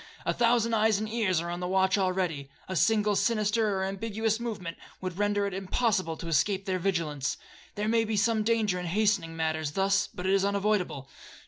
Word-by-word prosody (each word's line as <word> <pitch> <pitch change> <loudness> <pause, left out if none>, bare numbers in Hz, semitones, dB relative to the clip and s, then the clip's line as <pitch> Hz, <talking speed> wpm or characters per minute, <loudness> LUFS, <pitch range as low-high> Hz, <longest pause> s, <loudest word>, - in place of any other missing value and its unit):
A - - +1
thousand 230 -1 +2
eyes 220 -1 +3
and 215 +1 -3
ears 210 -7 0
are 170 0 -4
on 175 - -4
the 180 - -3
watch 190 0 +2
already,—a 185 -4 -2
single 210 +1 +3
sinister 215 -1 +1
or 190 - -1
ambiguous 220 +3 -1
movement 210 -8 -5 0.2
would 185 0 -5
render 205 0 +1
it 200 - -3
impossible 190 -3 0
to 170 - -7
escape 190 +5 +1
their 185 -1 -1
vigilance. 165 -7 -1 0.4
There 210 0 -2
may 225 0 +3
be 220 -1 -2
some 220 +1 +2
danger 215 -4 +1
in 180 - -4
hastening 195 -3 +1
matters 160 -2 -1
thus, 195 +1 +2
but 180 - -8
it 190 - +2
is 195 -1 +3
unavoidable. 200 -8 0
195 Hz, 190 wpm, -28 LUFS, 180-215 Hz, 0.4 s, eyes